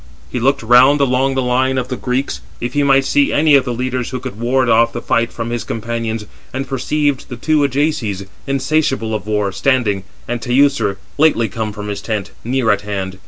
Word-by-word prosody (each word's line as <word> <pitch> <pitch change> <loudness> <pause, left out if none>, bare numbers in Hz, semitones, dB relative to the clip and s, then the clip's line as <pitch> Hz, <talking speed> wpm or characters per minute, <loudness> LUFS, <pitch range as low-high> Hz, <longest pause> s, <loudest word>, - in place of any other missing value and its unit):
He 125 - -2
looked 135 +1 +1
round 125 +5 +6
along 135 0 +2
the 130 - +1
line 130 +2 +1
of 125 -1 -2
the 130 - -2
Greeks, 130 +2 -2 0.2
if 120 +1 -4
he 145 - +2
might 135 -1 +4
see 285 - +2
any 155 0 +3
of 140 -2 +5
the 125 - -2
leaders 125 0 -2
who 130 - -4
could 125 -4 -7
ward 130 +2 +1
off 115 0 +4
the 120 - -3
fight 115 0 0
from 115 0 -5
his 120 -1 -2
companions, 115 -1 -3 0.3
and 135 +1 -4
perceived 140 +1 -1
the 125 - -5
two 155 +5 +1
Ajaces, 130 -8 -1 0.2
insatiable 135 -4 0
of 105 -1 -4
war, 105 -2 0
standing, 105 -2 +1 0.2
and 120 0 -3
Teucer, 130 -4 +2 0.2
lately 145 -7 +4
come 110 +2 -4
from 105 0 -7
his 100 -1 -4
tent, 105 -3 -3
near 125 -1 +1
at 100 -1 +1
hand. 95 -2 -4
125 Hz, 205 wpm, -17 LUFS, 110-135 Hz, 0.3 s, round